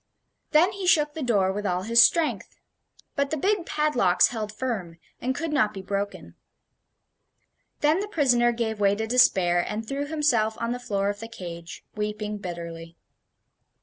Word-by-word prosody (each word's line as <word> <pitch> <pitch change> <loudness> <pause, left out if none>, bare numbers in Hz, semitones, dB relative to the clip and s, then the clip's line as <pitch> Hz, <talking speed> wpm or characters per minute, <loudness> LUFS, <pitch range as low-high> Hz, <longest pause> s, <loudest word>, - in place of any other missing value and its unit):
Then 340 +5 +4
he 390 -2 -5
shook 300 -4 +3
the 320 - -6
door 205 -7 +2
with 205 +1 -4
all 180 -2 -1
his 230 +3 +5
strength; 330 +2 +1 0.6
but 280 -2 0
the 315 - -2
big 390 +2 0
padlocks 250 -12 +3
held 215 -3 -4
firm, 210 -8 -4 0.2
and 260 +2 -1
could 325 +1 -3
not 215 -8 +1
be 190 - -7
broken. 200 +1 -4 1.5
Then 305 +4 +3
the 410 - -3
prisoner 250 -10 +3
gave 225 -2 -3
way 200 -1 +3
to 220 +2 -2
despair, 190 -7 +3
and 220 +1 -5
threw 280 +3 -3
himself 250 -8 +1
on 230 0 -2
the 245 - -3
floor 200 -4 -1
of 205 0 -4
the 225 - -7
cage, 170 -6 -9
weeping 210 0 -3
bitterly. 170 -2 -7
225 Hz, 165 wpm, -25 LUFS, 200-285 Hz, 1.5 s, his